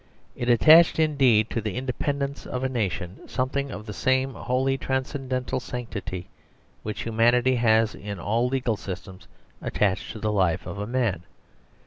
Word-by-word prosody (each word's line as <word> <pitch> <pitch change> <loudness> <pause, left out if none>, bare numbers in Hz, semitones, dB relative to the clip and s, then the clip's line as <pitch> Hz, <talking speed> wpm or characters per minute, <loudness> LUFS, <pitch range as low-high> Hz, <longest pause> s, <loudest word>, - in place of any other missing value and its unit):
It 120 - -2
attached 160 +8 +7
indeed 135 -9 +3
to 115 - -1
the 105 -2 -4
independence 140 +2 -3
of 125 0 -3
a - - +2
nation 100 -6 -2
something 140 +2 -2
of 105 -4 -7
the 105 - -6
same 130 +4 +1
wholly 130 +3 0
transcendental 130 -1 -2
sanctity 115 -8 -6 0.5
which 105 0 -5
humanity 120 +3 +3
has 110 -1 +3
in 100 -1 -7
all 115 +7 0
legal 125 -4 -1
systems 95 -2 -8 0.3
attached 100 -1 0
to 110 - -8
the 110 0 -1
life 95 -5 +1
of 100 - -6
a 105 - -3
man. 115 -8 0
120 Hz, 150 wpm, -25 LUFS, 105-130 Hz, 0.5 s, attached